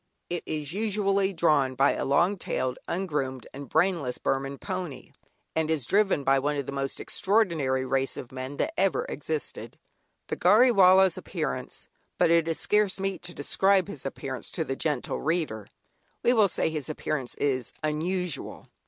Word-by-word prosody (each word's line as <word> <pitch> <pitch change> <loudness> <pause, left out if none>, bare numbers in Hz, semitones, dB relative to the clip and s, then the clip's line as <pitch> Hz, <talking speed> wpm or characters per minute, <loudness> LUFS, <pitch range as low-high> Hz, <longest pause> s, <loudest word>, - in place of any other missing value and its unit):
It 175 - -1
is 150 -1 -3
usually 200 -2 +1
drawn 150 -7 +2
by 135 +2 +4
a - - -2
long 170 +8 +3
tailed, 130 -8 -3
ungroomed 150 -8 -2
and 140 -2 -8
brainless 165 -10 +1
Burman 135 +1 -2
pony, 180 -8 -6 0.4
and 160 -1 0
is 155 -6 0
driven 195 -6 +2
by 135 0 +3
one 145 +2 -1
of 140 - -2
the - - -5
most 135 -1 -3
extraordinary 165 -11 +1
race 135 0 0
of 125 - -8
men 130 +2 -6
that 320 - -1
ever 470 - +1
existed. 465 -2 -4 0.5
The - - -4
"Gharry 220 +8 +6
Wallah's" 190 -3 +5
appearance 150 -9 -4 0.3
but - - +3
it 165 -1 +4
is 165 - 0
scarce 210 -2 +3
meet 195 0 -2
to 175 0 -7
describe 190 +6 +2
his 155 -9 -5
appearance 135 -1 -5
to 165 - -1
the 135 - -3
gentle 150 +1 -2
reader; 155 - -1 0.6
we 245 - +4
will 215 -4 +5
say 165 - -1
his 155 -2 -4
appearance 150 -4 -3
is 130 -4 -1
unusual. 170 +3 -3
160 Hz, 165 wpm, -27 LUFS, 135-190 Hz, 0.6 s, Gharry